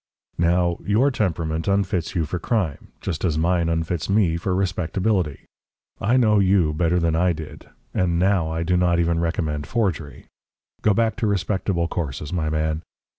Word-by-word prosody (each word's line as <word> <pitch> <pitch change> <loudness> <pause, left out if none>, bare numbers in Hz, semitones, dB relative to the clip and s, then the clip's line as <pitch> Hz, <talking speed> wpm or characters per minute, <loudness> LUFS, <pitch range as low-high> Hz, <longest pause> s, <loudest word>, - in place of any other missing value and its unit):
"Now, 85 0 +2
your 115 +8 +3
temperament 80 - -1
unfits 95 -4 0
you 85 -3 +1
for 85 +4 -4
crime 90 - -1
just 85 -5 -4
as 80 -5 +1
mine 85 +1 +1
unfits 80 +1 -2
me 95 -5 +3
for 90 +2 -1
respectability. 90 -2 -1 0.5
I 115 +5 +2
know 110 -4 +4
you 95 -5 +3
better 85 +2 +1
than 85 -1 +1
I 90 +2 +2
did, 80 -1 -9 0.2
and 85 -2 +1
now 90 -2 +2
I 80 +1 -2
do 90 +2 +1
not 90 -1 +2
even 85 -1 +1
recommend 80 -4 -2
forgery. 90 -11 -2 0.6
Go 105 -2 +3
back 115 -1 +1
to 115 -2 0
respectable 95 -3 0
courses, 75 -3 -4
my 80 -3 0
man. 80 0 -1
85 Hz, 165 wpm, -23 LUFS, 80-95 Hz, 0.6 s, know